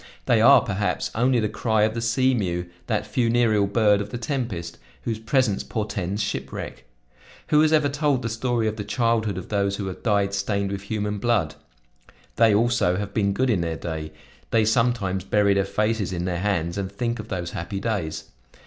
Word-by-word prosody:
They 115 -3 +3
are, 135 +2 +8
perhaps, 100 -2 -2
only 125 +2 +2
the 110 - +1
cry 110 0 +1
of 110 0 +2
the 115 - -3
sea 130 +3 +2
mew, 90 -6 -1 0.2
that 110 -2 0
funereal 115 -2 +2
bird 105 -1 +3
of 105 - -5
the 120 - -5
tempest, 115 - -4 0.2
whose 115 -2 -2
presence 115 -2 +1
portends 105 -2 -3
shipwreck. 65 - -5 0.6
Who 150 - +5
has 155 0 +3
ever 155 -2 +4
told 140 -2 0
the - - -1
story 115 0 0
of 110 0 -2
the 105 - -3
childhood 110 -2 0
of 95 - -7
those 100 -1 0
who 100 - -4
have 95 -1 -6
died 100 -3 +1
stained 100 0 -1
with 100 -1 -4
human 105 0 -3
blood? 105 -9 +1 0.8
They, 115 -1 +5
also, 110 -4 +2
have 100 -1 -4
been 100 -2 +1
good 130 +5 +1
in 95 -6 +1
their 85 -1 -2
day; 80 -2 -5 0.4
they 110 -1 +3
sometimes 110 -5 +1
bury 100 0 +3
their 100 0 +1
faces 105 -1 -1
in 90 -1 -3
their 90 -2 -2
hands 90 -2 -1
and 95 -1 -3
think 115 +3 -2
of 105 - -7
those 90 -4 -4
happy 95 +3 -4
days. 95 -8 -2
105 Hz, 195 wpm, -24 LUFS, 100-115 Hz, 0.8 s, are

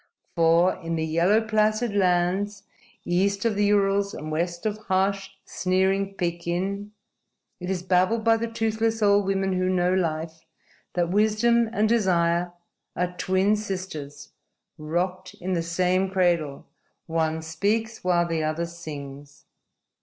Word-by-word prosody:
For, 170 +2 +4
in 165 -2 -4
the 160 -1 -1
yellow, 170 +7 +3
placid 215 0 +1
lands 190 +2 +1 0.4
east 200 +4 +1
of 230 - +2
the 205 0 +2
Urals 200 -1 +2
and 155 +1 -6
west 170 +3 -2
of 215 0 -1
harsh, 195 +1 0 0.2
sneering 190 +1 0
Pekin, 180 +4 -3 0.7
it 180 0 -5
is 185 -2 -2
babbled 185 +5 +2
by 225 0 +4
the 230 +1 -2
toothless 225 0 -1
old 200 -1 +4
women 195 -1 0
who 185 0 0
know 180 -1 +2
life, 160 -2 -2 0.5
that 175 -1 0
wisdom 220 +3 +3
and 215 -1 +1
desire 175 -6 +2 0.4
are 180 0 -2
twin 190 +3 +2
sisters 185 -8 -6 0.5
rocked 180 +4 -3
in 185 +1 -4
the 170 - 0
same 180 +3 +1
cradle: 170 -7 0 0.4
one 160 -1 -1
speaks 210 +8 -1
while 175 -1 +2
the 165 -2 -1
other 155 +2 -1
sings. 145 -4 -9
185 Hz, 135 wpm, -25 LUFS, 170-205 Hz, 0.7 s, For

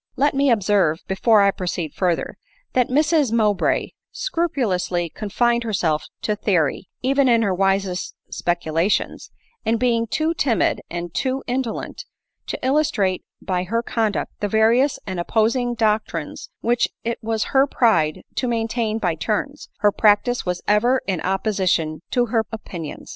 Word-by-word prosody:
Let 285 +2 +2
me 275 0 +2
observe, 200 -7 +2
before 205 +2 +4
I 200 - +4
proceed 175 -5 -4
further, 180 -3 -1 0.4
that 250 -2 +3
Mrs 300 -1 +2
Mowbray 210 -4 +1 0.2
scrupulously 220 - -1
confined 235 +3 0
herself 175 -9 0 0.2
to 210 - 0
theory, 180 -5 0
even 270 0 +3
in 230 -1 +4
her 195 -3 +1
wisest 195 -1 0 0.2
speculations 170 +2 -1 0.2
;~ 470 0 -41
and 225 0 +1
being 230 -2 +1
too 315 +8 0
timid, 265 -9 +1
and 175 0 -5
too 265 0 -1
indolent, 250 -2 -3 0.4
to - - -3
illustrate 260 -10 +1 0.2
by 180 -2 -1
her 230 +5 -1
conduct 220 -3 -1
the 205 - -1
various 230 +6 +3
and 185 -2 -4
op 175 - -3
posing 240 +2 +1
doctrines 210 -8 -1
which 240 +1 +2 0.2
it 235 0 -2
was 220 -1 -1
her 270 +1 +5
pride 170 - +2
to 255 - 0
maintain 230 -1 -1
by 180 -6 0
turns, 220 - -3
her 205 -1 +5
practice 210 +2 +2
was 180 0 -2
ever 240 +5 +3
in 185 -4 -2
opposition 185 -5 0
to 245 -1 +2
her 225 -1 +3
opinions. 175 -8 -7
220 Hz, 150 wpm, -22 LUFS, 185-245 Hz, 0.4 s, her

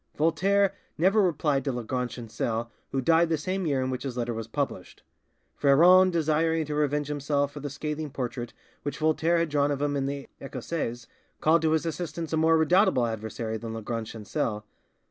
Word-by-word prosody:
Voltaire 190 +5 +2 0.2
never 190 +7 +4
replied 150 -6 +1
to 140 - -1
Lagrange 125 0 -3
Chancel, 115 0 -3 0.2
who 135 - 0
died 165 +5 +4
the 160 - +1
same 185 +3 -2
year 135 -3 +1
in 130 - -2
which 130 - -3
his 130 -3 -5
letter 120 -1 -1
was 115 -1 -5
published. 140 +4 -4 0.5
Freron 175 +7 +6
desiring 160 -1 +1
to 150 - -4
revenge 150 0 0
himself 145 -1 0
for 145 - -8
the 145 0 -5
scathing 150 +2 -4
portrait 120 -2 -4 0.3
which 145 - -4
Voltaire 160 +2 +2
had 165 -1 +1
drawn 145 -1 +2
of 145 -2 -1
him 145 0 0
in 135 -1 0
the 140 0 -5
'Ecossaise', 130 -2 -4 0.3
called 160 +1 +4
to 160 -1 +2
his 160 +1 +1
assistance 165 0 -4
a - - +2
more 160 +1 +4
redoubtable 160 - +4
adversary 110 0 -4
than 115 0 -6
Lagrange 115 0 -4
Chancel. 105 0 -3
145 Hz, 185 wpm, -27 LUFS, 125-160 Hz, 0.5 s, Freron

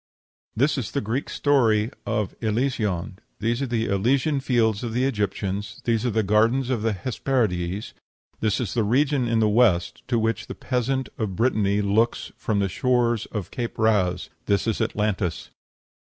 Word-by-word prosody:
This 145 0 +2
is 115 - -4
the 140 - -1
Greek 120 +6 -2
story 115 -6 +2 0.2
of 105 -3 -1
Elysion; 110 -5 -1 0.2
these 115 +4 0
are 135 - -1
the 115 -2 0
Elysian 130 +9 +1
Fields 115 -6 +1
of 115 -2 -3
the 125 +2 +1
Egyptians; 100 -4 -2
these 115 0 +1
are - - +2
the 110 0 +1
Gardens 115 +6 +2
of 120 -4 0
the 110 0 +1
Hesperides; 100 -4 -1 0.5
this 105 -2 +1
is 120 -7 -2
the 115 - +1
region 130 +3 +2
in 115 0 +1
the 110 - +4
West 105 -6 +2
to 120 - +1
which 115 0 -1
the - - -6
peasant 130 +1 -1
of 105 -5 -2
Brittany 105 -3 +1
looks 110 +4 +1
from 110 - -1
the 100 -1 +2
shores 120 +2 +1
of 105 -5 -5
Cape 120 -2 -4
Raz; 95 -5 +1 0.2
this 100 -2 +2
is 115 -2 -1
Atlantis. 100 -5 -1
110 Hz, 170 wpm, -24 LUFS, 100-125 Hz, 0.5 s, the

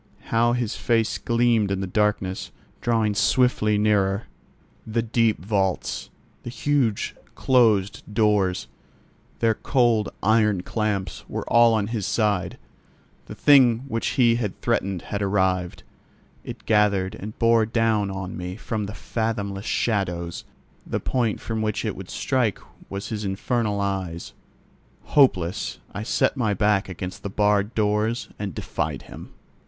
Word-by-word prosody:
How 120 +1 +3
his 120 -3 -1
face 115 -3 0
gleamed 115 -3 +2
in 95 -1 -1
the 95 - -2
darkness, 95 -1 -1 0.3
drawing 115 -3 +1
swiftly 105 -1 +2
nearer! 105 -1 +2 0.6
The 115 +1 0
deep 115 -6 +1
vaults, 95 -3 -1 0.3
the - - -7
huge 125 -4 0 0.2
closed 110 -7 +3
doors, 105 -4 +1 0.7
their 115 -1 +4
cold 120 -3 +1
iron 105 -3 +3
clamps 105 -3 -2
were - - -4
all 115 -1 +5
on 105 -2 +1
his 110 -2 -3
side. 105 -5 0 0.7
The - - -8
thing 130 -5 +5
which 115 -3 -2
he 120 -3 +4
had 105 -6 -3
threatened 95 -3 -1
had 100 - -4
arrived: 95 -3 0 0.6
it - - -9
gathered 100 -3 +2
and 105 +2 -8
bore 115 -1 +3
down 110 -3 +1
on 95 -1 -5
me 90 +1 -5
from 110 -1 -3
the 105 - -7
fathomless 105 -4 -3
shadows; 90 -6 -1 0.4
the - - -3
point 120 -5 -1
from 110 -1 -3
which 110 +1 -1
it 110 - -2
would 95 -1 -9
strike 125 -7 0 0.3
was 100 +1 -5
his 105 -2 -4
infernal 105 +2 -1
eyes. 95 -4 -3 0.7
Hopeless, 95 - +2 0.2
I 100 - -4
set 110 - +1
my 110 -6 0
back 105 -1 +1
against 90 0 -6
the 100 - -4
barred 105 +1 +1
doors 110 +2 0
and 100 -6 -4
defied - - -3
him. - - -11
105 Hz, 135 wpm, -24 LUFS, 100-115 Hz, 0.7 s, all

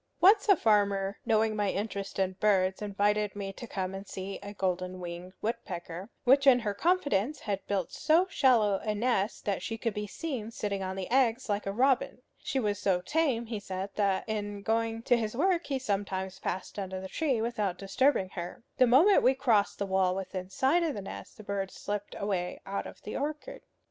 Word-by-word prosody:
Once 410 +3 +6
a 400 - +9
farmer, 200 - +2
knowing 220 0 +3
my 205 -2 +1
interest 200 -1 -3
in 190 -1 +1
birds, 190 -2 +2
invited 205 0 0
me 195 -1 -4
to 240 - -9
come 190 -3 -3
and 195 +1 -7
see 195 +1 -6
a 200 - -7
golden 185 -2 -2
winged 175 +1 -7
woodpecker, 185 -4 -4
which 275 +2 +5
in 260 -2 +8
her 210 -3 -1
confidence 285 - +1
had 200 -2 -3
built 195 -4 -1
so 330 +4 +3
shallow 225 - +3
a 215 -1 -2
nest 210 -2 0
that 200 -3 -1
she 225 +4 -4
could 230 -1 -2
be 210 +1 -4
seen 250 -2 -4
sitting 205 -3 -3
on 190 0 -3
the 190 -1 -4
eggs 255 -1 +2
like 205 0 -1
a - - 0
robin. 260 +3 +1 0.2
She 270 - -2
was 205 -4 -1
so 190 -3 +2
tame, 265 - +1
he 225 -2 -4
said, 190 0 -5
that 200 -1 0
in 205 -2 -3
going 225 +1 0
to 245 - +4
his 220 -1 -2
work 350 +2 +2
he 275 - 0
sometimes 195 -5 -2
passed 190 +2 -4
under 190 -1 -4
the 190 - -6
tree 270 +2 0
without 215 -5 -1
disturbing 195 +1 +1
her. 175 +3 -7
The 255 - +6
moment 320 - +6
we 260 +1 +4
crossed 230 -7 +2
the 200 - -1
wall 190 -1 +2
within 185 -1 -5
sight 270 - +2
of 325 -6 0
the 205 - -4
nest, - - -9
the 215 - -10
bird 200 -1 -2
slipped 205 +1 -5
away 190 -3 -2
out 200 +1 -3
of - - -13
the 210 - -6
orchard. 300 +1 -4
205 Hz, 200 wpm, -30 LUFS, 195-245 Hz, 0.2 s, a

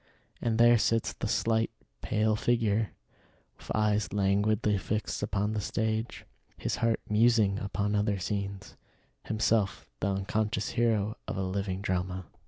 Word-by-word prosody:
And 115 -2 0
there 120 0 +6
sits 115 +2 +1
the - - -4
slight, 115 0 +1 0.3
pale 110 0 +1
figure 110 -2 +1 0.7
with - - -11
eyes 105 -3 +1
languidly 100 +1 +2
fixed 105 +3 -2
upon 105 0 0
the 105 - -1
stage; 110 +2 -2 0.3
his - - -2
heart 115 -1 +1
musing 105 -2 +3
upon 100 +1 -2
other 105 -1 +1
scenes; 100 +1 -4 0.5
himself 110 -4 +1
the - - 0
unconscious 105 +2 -1
hero 110 -3 +1
of - - -3
a 95 - -1
living 95 0 -2
drama. 95 -1 -2
105 Hz, 135 wpm, -29 LUFS, 100-110 Hz, 0.7 s, there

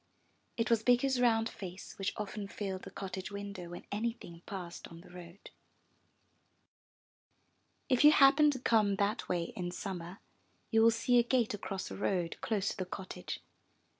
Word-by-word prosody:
It 230 +1 0
was 230 -2 +4
Bikku's 250 +2 +3
round 225 -2 +3
face 190 -4 -8
which 195 - 0
often 210 -1 -4
filled 195 -2 -4
the - - -9
cottage 190 -1 -6
window 200 -3 -6
when 175 - -9
any 225 +3 0
thing 170 -7 -12
passed 180 -4 -7
on 165 0 -12
the - - -16
road. 180 +1 -12 2.4
If 255 -1 +3
you 300 - +10
happen 290 +1 +6
to 285 - -1
come 220 -5 +3
that 200 +3 -1
way 175 -2 -1
in 175 -2 -3
Summer, 180 0 -6 0.5
you 225 -1 +5
will 225 - +7
see 235 +2 +3
a - - +5
gate 240 -2 +1
across 195 -2 -4
the - - -7
road 180 -4 -1
close 205 -3 0
to - - -5
the 185 - -2
cottage. 185 - -6
200 Hz, 165 wpm, -33 LUFS, 185-230 Hz, 2.4 s, you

